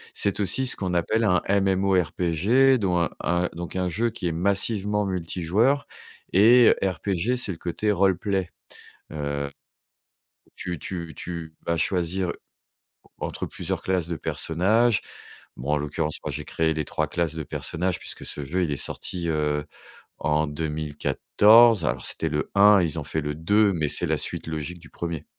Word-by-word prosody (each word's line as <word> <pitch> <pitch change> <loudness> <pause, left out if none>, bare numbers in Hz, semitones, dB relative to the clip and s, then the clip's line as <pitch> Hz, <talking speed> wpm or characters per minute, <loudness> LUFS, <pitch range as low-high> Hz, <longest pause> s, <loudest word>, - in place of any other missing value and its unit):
c'est 100 +1 -1
aussi 105 +7 +1
ce 125 - +1
qu'on 90 -2 -2
appelle 110 +7 +1
un 90 -4 +3
MMORPG, 95 - +2
dont 90 -3 +1
un 85 - +1
un 90 0 0
donc 85 +1 -7
un 90 -1 0
jeu 110 +7 0
qui 110 -4 -7
est - - 0
massivement 100 +3 0
multijoueur 95 - 0 0.5
et 115 +5 +7
RPG, 95 +5 0
c'est 105 - -2
le 85 - -6
côté 105 +5 -1
roleplay, 95 -1 +1 0.6
heu 70 -1 -3 1.1
tu 90 -3 -4
tu 85 -1 -6
tu 85 -2 -7
vas 85 - +1
choisir, 90 +2 0
heu, - - -1 0.9
entre - - -4
plusieurs - - -4
classes 90 -3 -1
de 85 - -3
personnages. 105 +10 +1 0.6
Bon, 65 +4 -3
en - - +3
l'occurrence, 75 +1 -2
moi, 75 - -3
j'ai 75 0 -5
créé 80 -1 0
les 75 -2 -2
3 - - -1
classes 85 -2 -2
de 80 - -4
personnages 90 +5 -3
puisque - - -8
ce 75 - -5
jeu, 90 +6 0
il 75 - -1
est 70 - -1
sorti, 85 -2 -4
heu, 75 -1 0 0.5
en 75 0 +1
2014. 80 +8 +3
Alors, 65 -2 -1
c'était 80 - 0
le 75 0 -2
1, 100 -1 +7
ils 80 -1 -1
ont 75 - -4
fait 80 +2 -2
le 75 0 -3
2, 100 +6 +3
mais 80 -5 -1
c'est - - 0
la - - +1
suite - - -4
logique 80 +2 -5
du 80 -2 -16
1er 85 -3 -5
90 Hz, 170 wpm, -25 LUFS, 80-100 Hz, 1.1 s, et